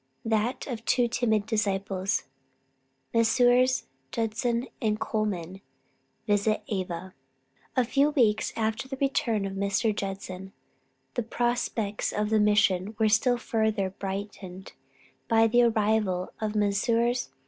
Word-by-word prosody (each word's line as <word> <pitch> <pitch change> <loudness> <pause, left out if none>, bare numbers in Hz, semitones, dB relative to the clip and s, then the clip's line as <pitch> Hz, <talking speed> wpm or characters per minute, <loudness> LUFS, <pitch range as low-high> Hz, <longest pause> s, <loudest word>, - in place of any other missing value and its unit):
THAT 225 +3 0
OF 235 -4 -5
TWO 245 0 +2
TIMID 225 -3 +1
DISCIPLES. 195 -3 -1 0.9
MESSRS. 245 +2 +4 0.3
JUDSON 230 +2 -1 0.2
AND 215 -2 0
COLMAN 195 -4 -2 0.6
VISIT 210 0 +1
AVA. 185 -2 -4 0.6
A 255 - +4
few 275 +4 +3
weeks 230 -8 +2
after 220 +2 -1
the 270 0 -6
return 235 -6 0
of 195 - -4
Mr. 200 +2 0
Judson, 195 -1 -5 0.6
the 245 - -1
prospects 230 -3 -1
of 210 +1 -1
the 220 - +4
Mission 205 -1 +2
were 220 -1 +3
still 245 +3 +3
further 220 -5 0
brightened 190 -1 -6 0.5
by 225 -1 +4
the 240 +2 +4
arrival 215 -5 +1
of 215 0 -2
Messrs. 230 - +1
215 Hz, 115 wpm, -27 LUFS, 200-235 Hz, 0.9 s, MESSRS